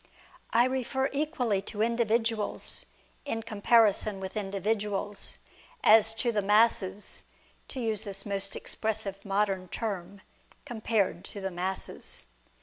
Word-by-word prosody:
I 235 +2 +5
refer 265 +1 -1
equally 265 - 0
to 210 0 -1
individuals 230 -1 0 0.4
in 225 -6 -3
comparison 215 -2 +3
with 190 +1 -6
in 205 -2 -2
dividuals, 205 0 -1 0.5
as 220 0 +6
to 235 +1 +1
the 210 -2 +1
masses 210 -1 +2 0.4
(to 265 - -6
use 220 -3 0
this 195 -2 -5
most 195 -1 -1
expressive 210 -3 -2
modern 195 -2 0
term) 195 -2 -4 0.4
compared 220 -7 0
to 205 - -7
the 190 0 -2
masses. 185 +2 -3
210 Hz, 120 wpm, -29 LUFS, 195-230 Hz, 0.5 s, as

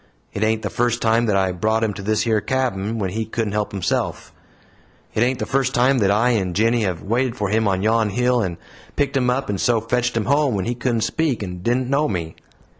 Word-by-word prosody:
It 100 - -2
ain't 110 0 +1
the - - -3
first 120 0 0
time 115 +1 +2
that 105 - +2
I 95 -1 +1
brought 110 +5 0
him 110 -2 0
to 100 - -8
this 110 +3 0
yer 110 -2 +2
cabin 115 -5 -1
when 95 -4 -2
he 110 +3 -2
couldn't 110 -1 -3
help 105 0 -1
himself; 95 -3 -2 0.8
it 110 - 0
ain't 125 +2 +2
the - - -3
first 135 -1 0
time 125 +2 +3
that 100 -3 +2
I 110 +5 +3
and 95 -6 -1
'Jinny' 115 +3 +2
have 95 -5 -2
waited 120 +3 0
for 105 -5 -2
him 110 +1 +1
on 95 -1 0
yon 110 0 +2
hill, 125 +3 +1
and 90 -5 -3 0.4
picked 140 -1 0
him 125 -2 +2
up 135 +2 0
and 100 -2 -2
so 120 -2 +3
fetched 120 +1 -1
him 115 - 0
home, 140 -2 +2
when 95 - -2
he 120 - -1
couldn't 120 -1 -1
speak, 130 -1 0
and 90 -2 -6
didn't 120 +5 0
know 140 +3 +1
me. 85 -4 -4
115 Hz, 240 wpm, -21 LUFS, 100-125 Hz, 0.8 s, time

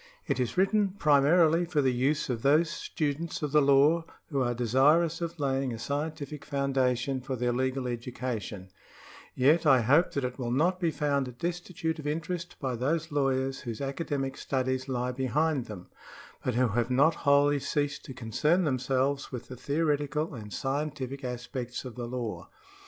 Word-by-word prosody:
It - - -1
is 125 +4 -1
written 195 +1 +2
primarily 160 +3 +4
for 170 -3 -1
the 130 -3 +3
use 140 +5 +1
of 120 -3 -2
those 155 +5 +3
students 155 +2 -3
of 150 - -1
the 150 0 +5
law 140 +4 +4 0.3
who 140 -2 +1
are 120 -1 0
desirous 150 +8 +3
of 170 -1 -4
laying 135 -2 0
a 115 - -4
scientific 145 +3 -4
foundation 135 -1 0
for 130 +1 -4
their 120 0 0
legal 130 +1 -1
education; 120 -5 -5 0.6
yet 150 +6 +4
I 135 -3 +6
hope 145 +10 +3
that 140 - -1
it 125 +1 -4
will 120 -2 -2
not 170 +9 +2
be 170 -3 +1
found 140 -5 -1
destitute 170 0 -3
of 150 - -5
interest 165 +3 -3
by 130 -3 -2
those 155 +7 -1
lawyers 135 -2 0
whose 115 -4 -6
academic 135 -1 -3
studies 130 0 -2
lie 125 -1 -1
behind 135 +2 0
them, 95 -4 -9 0.5
but 125 - -1
who 125 0 +3
have 120 +3 0
not 140 +6 +4
wholly 145 0 +4
ceased 145 +1 -2
to 130 - -8
concern 150 - +1
themselves 135 0 0
with 125 -2 -7
the 130 - -7
theoretical 150 +2 -1
and 110 -4 -8
scien 140 +7 -2
tific 135 +1 -6
aspects 125 0 -5
of 125 - -6
the 120 0 -5
law. 120 -8 -5
135 Hz, 170 wpm, -29 LUFS, 125-150 Hz, 0.6 s, I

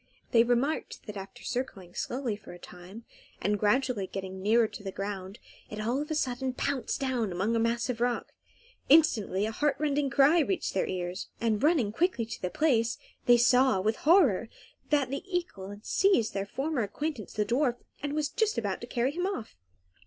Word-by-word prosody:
They 230 -1 +6
remarked 245 +6 -1
that 210 - -7
after 195 0 -9
circling 195 -8 -4
slowly 250 -4 -2
for 205 -3 -12
a - - -10
time, 180 +6 -12 0.3
and 205 +2 0
gradually 220 -1 +1
getting 190 0 -6
nearer 220 +3 +4
to - - -10
the 195 -1 -5
ground, 195 0 -5 0.3
it 215 - -6
all 235 +6 0
of 300 - -5
a 315 - -1
sudden 260 -2 -1
pounced 270 -1 -2
down 250 -6 -1
amongst 195 +6 0
a - - +2
mass 230 0 0
of 240 -2 -3
rock. 245 0 -1 0.6
Instantly 225 - +4
a 220 - -2
heart 295 +5 +1
rending 290 -2 0
cry 280 +6 +5
reached 355 +4 0
their 190 - 0
ears, 180 +1 -4
and, 225 -2 0
running 290 -9 +3
quickly 325 - 0
to 230 - -8
the 180 - -1
place, 240 - +1 0.3
they 245 0 +7
saw, 250 -2 +4
with 220 +4 0
horror, 290 - +4 0.4
that 285 -4 +2
the 275 - -2
eagle 340 - -3
had 205 +1 -10
seized 380 - +2
their 195 0 -2
former 275 +4 -2
acquaintance, 250 +2 -4
the 210 -1 0
dwarf, 245 +1 +1 0.3
and 285 0 -3
was 300 -1 0
just 440 +5 0
about - - -2
to - - -7
carry 250 +2 0
him 355 +5 -1
off. 255 - -5
235 Hz, 190 wpm, -29 LUFS, 205-280 Hz, 0.6 s, they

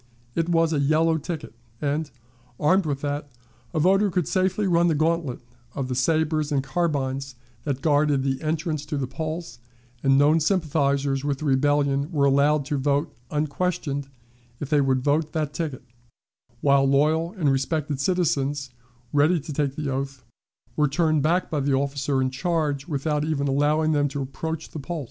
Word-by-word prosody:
It 165 +4 -1
was 165 -1 +3
a 150 - +1
yellow 160 +3 +2
ticket, 155 -5 -6 0.3
and, 150 +1 -1 0.5
armed 185 +3 +3
with 140 -2 -2
that, 145 0 -3 0.4
a 160 - -1
voter 195 +5 +4
could 180 -4 -1
safely 185 +3 +1
run 170 -2 +3
the 165 - +2
gantlet 155 -4 0 0.3
of 135 -2 -3
the - - -1
sabers 155 +3 +1
and 140 -2 +1
carbines 135 -3 -2 0.3
that 135 -3 -2
guarded 145 -3 +3
the 135 -1 -1
entrance 155 -1 -2
to 150 -1 -2
the 135 - -1
polls, 155 +1 -5 0.4
and 135 -1 +4
known 150 +3 +5
sympathizers 140 -5 +1
with 145 -1 -1
the 155 - -6
rebellion 140 +1 +2
were 145 -4 +2
allowed 140 +1 +3
to 145 -1 -1
vote 145 +2 0
unquestioned 150 -2 -2 0.5
if 145 0 -6
they 150 -1 +4
would 130 -2 +1
vote 150 +2 +1
that 155 -3 -2
ticket, 150 -7 -4 0.8
while 140 -1 +4
loyal 155 +5 +2
and 160 -9 +1
respected 140 +1 -1
citizens, 145 -5 0 0.4
ready 150 +4 +4
to 150 +1 -7
take 140 -1 -1
the 150 -3 -3
oath, 135 -1 -4 0.5
were 150 -1 +3
turned 155 +1 +1
back 170 +5 +1
by 155 - 0
the 140 0 +1
officer 140 0 0
in 130 - -1
charge 150 -1 -1
without 150 -1 -1
even 150 -2 -1
allowing 150 +3 +2
them 145 -1 +2
to 140 0 -3
approach 160 +4 -5
the 155 - -6
polls. 165 +4 -4
145 Hz, 170 wpm, -24 LUFS, 140-160 Hz, 0.8 s, known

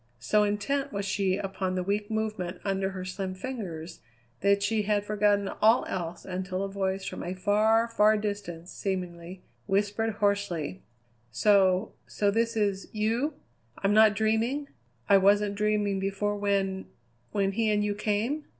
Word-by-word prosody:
So 210 - +2
intent 215 +8 0
was 200 -1 -3
she 190 -1 0
upon 190 -2 -3
the 185 - -1
weak 205 +2 -1
movement 215 -5 -3
under 195 -1 0
her 185 -1 -6
slim 185 0 -4
fingers 185 -8 -6 0.4
that 200 +1 +3
she 220 +1 +1
had 205 0 0
forgotten 205 -1 +2
all 220 +3 +5
else 175 -2 -5
until 185 0 -3
a 195 - -4
voice 195 -1 -2
from - - -5
a 180 +2 -4
far, 215 +4 +3
far 215 -1 +4
distance 200 -5 -5
seemingly, 180 -2 -5 0.2
whispered 205 +3 0
hoarsely: 200 - -1 0.5
"So 190 - +3
so 205 -1 +1
this 230 +1 0
is 200 -2 0
you? 230 +8 0 0.4
I'm 195 +1 +1
not 215 -1 +6
dreaming? 225 +7 0 0.4
I 200 - +7
wasn't 200 +1 +3
dreaming 210 -1 0
before 195 +2 -1
when 195 -2 -1 0.4
when 195 -1 +1
he 220 +2 0
and 210 -1 +2
you 210 0 0
came?" 215 +8 -1
200 Hz, 150 wpm, -28 LUFS, 190-215 Hz, 0.5 s, I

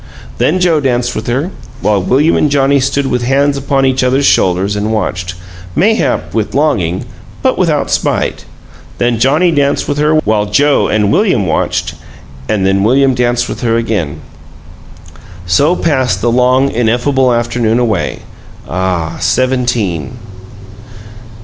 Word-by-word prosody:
Then 180 +5 +1
Joe 175 -4 +2
danced 125 -3 -1
with 110 - -5
her, 135 +10 -1 0.3
while 105 -2 +1
William 140 - +2
and 150 - +2
Johnnie 140 0 +2
stood 135 +1 0
with 125 -2 -1
hands 140 +3 +1
upon 135 0 0
each 130 0 +1
other's 130 +2 +1
shoulders 95 0 +2
and 105 +1 -2
watched, 90 -4 -3 0.4
mayhap 220 +4 0
with 110 +1 -2
longing, 100 - 0 0.4
but - - +2
without - - 0
spite; - - -1 0.5
then 120 -2 0
Johnnie 150 +8 +3
danced 145 -2 0
with 145 0 -2
her 150 +1 +2
while 105 -4 0
Joe 145 +8 +2
and 105 -1 +1
William 185 - +2
watched 80 - -1 0.6
and 100 -3 0
then 95 0 +1
William 130 +4 +3
danced 120 0 0
with - - -6
her 115 -2 +1
again. 105 -10 -2 1.2
So 140 - +2
passed 135 -8 0
the 120 - 0
long, 125 +3 +2
ineffable 125 +3 +1
afternoon 120 -1 0
away 110 -7 -1 0.4
ah, 90 -3 -2
Seventeen! 120 - -1
125 Hz, 140 wpm, -13 LUFS, 105-140 Hz, 1.2 s, Johnnie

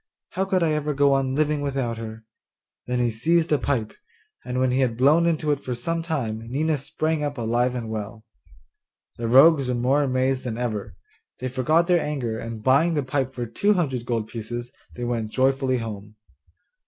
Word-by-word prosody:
How 190 - -1
could 190 -2 +1
I 160 - +2
ever 150 -1 -1
go 140 0 +4
on 135 -1 0
living 150 0 +1
without 135 -5 -2
her?' 110 0 -8 0.6
Then 125 0 -1
he 120 -1 +1
seized 160 +9 +1
a 150 - +3
pipe, 120 -5 -1 0.5
and 125 +1 -4
when 130 -1 +2
he 130 - +1
had 125 -4 +1
blown 150 +7 +4
into 155 -2 +1
it 145 - 0
for 125 -3 -4
some 165 +8 -2
time 135 -10 -2
Nina 150 +4 0
sprang 155 +3 -2
up 145 -1 -3
alive 120 +2 0
and 120 -2 -4
well. 110 0 -6 0.9
The 115 - -3
rogues 135 +3 +6
were 125 - 0
more 130 +4 +2
amazed 130 -1 0
than 120 -3 -4
ever; 115 -4 -3 0.4
they 130 - -3
forgot 145 +7 +2
their 175 -1 +3
anger, 130 -7 -3
and 115 -1 -7
buying 160 +6 +3
the 145 - 0
pipe 130 0 -1
for 120 - -3
two 200 - +1
hundred 130 -9 -1
gold 115 -3 -1
pieces, 120 +2 -6 0.2
they 120 - -5
went 115 -3 -2
joyfully 130 0 +2
home. 105 -2 -7
130 Hz, 190 wpm, -24 LUFS, 120-150 Hz, 0.9 s, rogues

